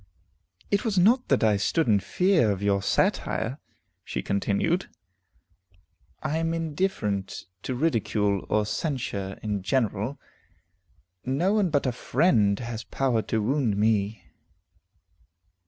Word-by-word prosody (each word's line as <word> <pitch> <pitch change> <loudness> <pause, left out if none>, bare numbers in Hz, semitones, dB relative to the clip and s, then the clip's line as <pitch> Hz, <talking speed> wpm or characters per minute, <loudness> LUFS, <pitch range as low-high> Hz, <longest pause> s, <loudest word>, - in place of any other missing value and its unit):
"It 200 +2 +2
was 220 -5 -1
not 235 +8 +4
that 135 - +2
I 105 -2 +4
stood 155 - +1
in 105 -3 +4
fear 180 - +2
of 100 0 -3
your 100 -1 +2
satire," 125 +7 0 0.4
she - - -4
continued; 105 - 0 1.3
"I 155 +3 -1
am 165 0 0
indifferent 150 - -2 0.2
to 130 - -3
ridicule 110 - 0
or 105 0 +2
censure 105 - -3
in 105 -2 -2
general; 115 +3 -1 1.0
no 145 +10 +1
one 205 -4 +2
but 145 -3 +1
a 130 - +1
friend 110 - +2
has 115 -1 -5
power 125 -4 0
to 110 0 -1
wound 125 -4 +1
me." 105 0 +1
120 Hz, 120 wpm, -26 LUFS, 105-160 Hz, 1.3 s, not